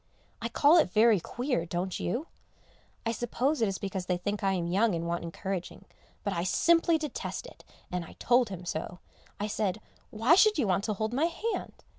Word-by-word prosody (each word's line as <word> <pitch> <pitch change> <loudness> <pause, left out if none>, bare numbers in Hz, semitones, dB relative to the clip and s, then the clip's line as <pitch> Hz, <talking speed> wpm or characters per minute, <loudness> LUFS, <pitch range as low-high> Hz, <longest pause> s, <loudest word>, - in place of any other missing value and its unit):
I - - -2
call 305 +4 +5
it 250 - +3
very 215 +1 +5
queer, 245 - -2
don't 175 +2 -3
you? 240 - -2 0.8
I 230 - +1
suppose 240 +5 -1
it 225 - +4
is 195 -1 -2
because 190 -2 -4
they 180 - +1
think 205 +3 -3
I 195 0 +2
am 175 -3 -1
young 195 +3 +2
and 165 0 -3
want 170 0 -2
encouraging, 180 +2 -5 0.4
but 200 - -1
I 170 -1 -1
simply 330 - +3
detest 305 - -5
it, - - -13 0.3
and 180 -1 -2
I - - -12
told 245 -1 +3
him 180 -2 -7
so. 170 +1 -4 0.4
I 205 - -1
said, 210 -1 -1 0.3
"Why 225 +8 +3
should 425 +4 +5
you 275 - +2
want 190 0 +1
to 215 - 0
hold 220 +3 -2
my 285 +6 +2
hand?" 365 +7 -4
210 Hz, 200 wpm, -29 LUFS, 180-255 Hz, 0.8 s, call